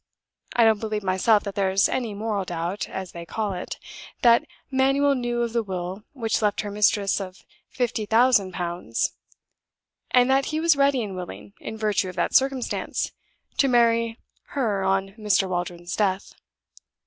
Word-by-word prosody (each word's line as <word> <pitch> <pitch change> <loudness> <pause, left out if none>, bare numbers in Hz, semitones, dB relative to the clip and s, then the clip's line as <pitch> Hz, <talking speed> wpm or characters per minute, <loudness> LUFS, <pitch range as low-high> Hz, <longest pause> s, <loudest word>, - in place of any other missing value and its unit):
I 235 - +5
don't 220 -2 +4
believe 215 -1 -3
myself 195 +3 +3
that 200 - -5
there's 195 0 +2
any 235 -5 -2
moral 210 -1 -2
doubt 175 +2 -3
(as 190 -1 -6
they 170 - -8
call 205 +4 -3
it) 180 - -5 0.5
that 235 -1 +6 0.3
Manuel 275 +2 +3
knew 240 -2 -1
of 235 -1 -3
the 235 - +2
will 190 0 -5
which 225 -6 -1
left 210 -2 +1
her 205 -1 -5
mistress 205 -1 +2
of 185 -1 -8 0.2
fifty 240 -4 -2
thousand 225 -4 +4
pounds; 175 - -2 1.0
and 250 -1 +5
that 270 +1 +3
he 310 - -2
was 330 -1 +4
ready 275 -3 +3
and 200 -3 -5
willing, 185 +2 -8
in 220 - -6
virtue 210 -3 0
of 180 - -9
that - - 0
circumstance, 270 -2 +1 0.5
to 275 - +5
marry 230 -2 +3 0.4
her 210 -7 +1
on 195 0 +1
Mr. 205 -2 +2
Waldron's 175 -1 -3
death. 195 -2 0
210 Hz, 160 wpm, -24 LUFS, 190-240 Hz, 1.0 s, that